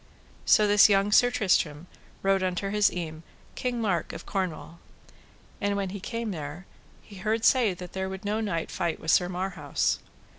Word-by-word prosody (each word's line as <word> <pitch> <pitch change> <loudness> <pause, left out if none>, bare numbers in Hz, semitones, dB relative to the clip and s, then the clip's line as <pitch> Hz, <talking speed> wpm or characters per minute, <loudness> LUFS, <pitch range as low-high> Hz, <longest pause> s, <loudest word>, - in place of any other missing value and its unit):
So 215 - +5
this 205 +1 +6
young 200 0 +3
Sir 245 +3 +6
Tristram 175 -9 +1 0.4
rode 195 0 +3
unto 185 +1 -1
his 210 0 +3
eme, 160 -3 -5 0.3
King 250 -1 -2
Mark 190 -7 -1
of - - -8
Cornwall. 170 -3 -4 0.8
And 205 0 0
when 195 -2 -2
he 200 - -6
came 230 +2 -4
there 155 +1 -7 0.4
he 205 - -13
heard 220 +4 -1
say 235 -8 +4
that 180 0 -10
there 190 0 -3
would 190 +1 -7
no 210 +2 0
knight 170 -7 -2
fight 170 -3 -2
with 160 - 0
Sir 180 -1 +3
Marhaus. 180 -5 -1
190 Hz, 175 wpm, -27 LUFS, 175-210 Hz, 0.8 s, this